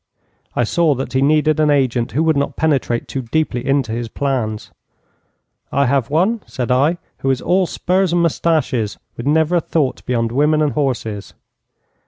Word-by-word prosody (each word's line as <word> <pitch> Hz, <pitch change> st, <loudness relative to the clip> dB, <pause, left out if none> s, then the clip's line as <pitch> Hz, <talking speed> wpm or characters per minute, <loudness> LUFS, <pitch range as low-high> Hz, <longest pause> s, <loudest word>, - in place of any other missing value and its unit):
'I 120 Hz, -, +2 dB
saw 155 Hz, +5 st, +2 dB
that 135 Hz, -, -5 dB
he 130 Hz, -, +2 dB
needed 155 Hz, +2 st, +3 dB
an 155 Hz, -1 st, +3 dB
agent 130 Hz, -5 st, +1 dB
who 150 Hz, +6 st, +1 dB
would 160 Hz, -1 st, +2 dB
not 140 Hz, 0 st, -1 dB
penetrate 135 Hz, -6 st, 0 dB
too 135 Hz, -, -4 dB
deeply 125 Hz, 0 st, -1 dB
into 135 Hz, -4 st, 0 dB
his 115 Hz, +1 st, -3 dB
plans. 120 Hz, -5 st, -2 dB, 1.0 s
'"I 140 Hz, -, +2 dB
have 130 Hz, -2 st, +1 dB
one," 190 Hz, +10 st, +1 dB
said 125 Hz, -2 st, -3 dB
I, 145 Hz, +7 st, +3 dB, 0.2 s
"who 135 Hz, -, -1 dB
is 130 Hz, -1 st, +1 dB
all 185 Hz, 0 st, +1 dB
spurs 185 Hz, +1 st, 0 dB
and 175 Hz, 0 st, +2 dB
moustaches, 150 Hz, -9 st, 0 dB, 0.2 s
with 120 Hz, -, -6 dB
never 160 Hz, +3 st, +3 dB
a -, -, +1 dB
thought 145 Hz, -6 st, -1 dB
beyond 115 Hz, -2 st, 0 dB
women 150 Hz, +4 st, +2 dB
and 150 Hz, -, +1 dB
horses." 120 Hz, -8 st, -3 dB
140 Hz, 175 wpm, -18 LUFS, 125-155 Hz, 1.0 s, needed